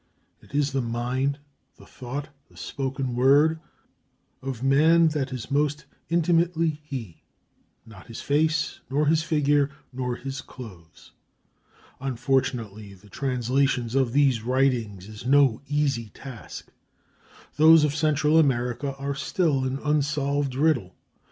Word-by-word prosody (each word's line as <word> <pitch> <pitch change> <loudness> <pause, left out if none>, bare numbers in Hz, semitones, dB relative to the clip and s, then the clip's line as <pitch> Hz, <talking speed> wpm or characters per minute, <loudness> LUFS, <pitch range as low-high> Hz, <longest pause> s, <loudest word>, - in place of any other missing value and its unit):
It - - -12
is 145 -1 +1
the 135 - 0
mind, 125 +4 -1 0.4
the - - -16
thought, 140 +4 -7 0.2
the - - -21
spoken 135 -1 -4
word, 145 +6 +4 0.8
of 130 -2 -5
man 160 +5 +5
that 140 -3 -2
is 130 +1 -6
most 150 +1 0 0.2
intimately 165 -2 +1
he; 125 - -7 0.6
not 105 -4 -14
his 115 - -8
face, 155 +2 0
nor 145 +3 +1
his 160 +1 +3
figure, 145 -3 +2 0.2
nor 125 -1 -2
his 135 +1 -6
clothes. 95 -10 -13 0.9
Unfortunately, 120 -6 -2
the 100 +2 -19
translation 125 -1 0
of 130 -3 +2
these 135 -3 +3
writings 120 -6 0
is 110 +3 -9
no 135 -4 +4
easy 140 -7 0
task. 130 -2 -10 0.9
Those 160 +1 +7
of 150 -2 +1
Central 155 0 +3
America 130 -1 0
are 140 +1 -3
still 140 -1 0
an 130 +1 -2
unsolved 145 -2 0
riddle. 140 - +1
135 Hz, 125 wpm, -25 LUFS, 125-150 Hz, 0.9 s, Those